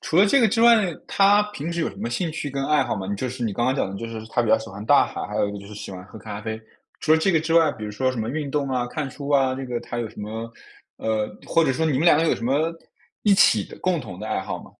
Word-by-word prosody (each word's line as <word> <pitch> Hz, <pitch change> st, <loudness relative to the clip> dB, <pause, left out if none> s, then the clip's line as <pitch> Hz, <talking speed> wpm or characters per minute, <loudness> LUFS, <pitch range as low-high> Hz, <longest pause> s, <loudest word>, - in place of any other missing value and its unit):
除 160 Hz, -, -1 dB
了 200 Hz, -, +7 dB
这 275 Hz, -, +4 dB
个 230 Hz, -, +6 dB
之 225 Hz, +2 st, 0 dB
外， 235 Hz, 0 st, +8 dB, 0.3 s
她 200 Hz, +1 st, +4 dB
平 170 Hz, -4 st, -4 dB
时 170 Hz, -, -2 dB
有 160 Hz, -, 0 dB
什 -, -, -12 dB
么 -, -, -3 dB
兴 165 Hz, +8 st, -1 dB
趣 150 Hz, -2 st, -4 dB
跟 135 Hz, 0 st, -2 dB
爱 150 Hz, 0 st, +3 dB
好 -, -, -2 dB
吗？ 95 Hz, -2 st, -5 dB
你 100 Hz, -, -2 dB
就 130 Hz, +5 st, -3 dB
是 125 Hz, 0 st, -6 dB
你 110 Hz, -3 st, -1 dB
刚 120 Hz, +4 st, -1 dB
刚 130 Hz, -, +2 dB
讲 135 Hz, -, -1 dB
的 100 Hz, -, -6 dB
就 115 Hz, -, -5 dB
是 110 Hz, -1 st, -7 dB
她 120 Hz, -, +1 dB
比 115 Hz, -, -2 dB
较 110 Hz, +1 st, +5 dB
喜 110 Hz, 0 st, -9 dB
欢 100 Hz, +1 st, -8 dB
大 -, -, +5 dB
海， -, -, -6 dB
还 -, -, -6 dB
有 105 Hz, -, +1 dB
一 -, -, -5 dB
个 100 Hz, -, -6 dB
就 100 Hz, -, -11 dB
是 105 Hz, -, -10 dB
喜 100 Hz, -, -7 dB
欢 90 Hz, -1 st, -8 dB
喝 110 Hz, +3 st, -12 dB
咖 105 Hz, -1 st, -7 dB
啡。 110 Hz, 0 st, -5 dB, 0.4 s
除 155 Hz, -, +3 dB
了 160 Hz, -, +6 dB
这 190 Hz, +4 st, +2 dB
个 160 Hz, -, +3 dB
之 165 Hz, +1 st, -1 dB
外， 165 Hz, -3 st, +5 dB
比 110 Hz, -, -8 dB
如 105 Hz, -, -4 dB
说 130 Hz, +5 st, 0 dB
什 125 Hz, -, -6 dB
么 110 Hz, -, -3 dB
运 145 Hz, +2 st, -3 dB
动 140 Hz, -1 st, -1 dB
啊、 125 Hz, -2 st, -1 dB
看 140 Hz, +2 st, -4 dB
书 140 Hz, +1 st, -8 dB
啊， 135 Hz, -2 st, +3 dB
这 135 Hz, +1 st, -5 dB
个 120 Hz, -2 st, -3 dB
她 120 Hz, -, -6 dB
有 120 Hz, -, -2 dB
什 105 Hz, -, -11 dB
么 110 Hz, +2 st, -6 dB, 0.4 s
呃， 110 Hz, -1 st, -1 dB, 0.2 s
或 165 Hz, -, +3 dB
者 135 Hz, -, +2 dB
说 160 Hz, +5 st, 0 dB
你 155 Hz, -, +1 dB
们 135 Hz, +3 st, +1 dB
两 170 Hz, -4 st, +6 dB
个 160 Hz, -, +2 dB
有 -, -, +2 dB
什 115 Hz, -, -6 dB
么 145 Hz, +6 st, +1 dB, 0.5 s
一 210 Hz, -, +4 dB
起 110 Hz, -, +5 dB
的 -, -, -13 dB
共 185 Hz, -2 st, 0 dB
同 100 Hz, -10 st, -8 dB
的 110 Hz, -, -5 dB
爱 110 Hz, -, -1 dB
好 95 Hz, -, -5 dB
吗？ -, -, -15 dB
130 Hz, 360 characters per minute, -23 LUFS, 110-155 Hz, 0.5 s, 外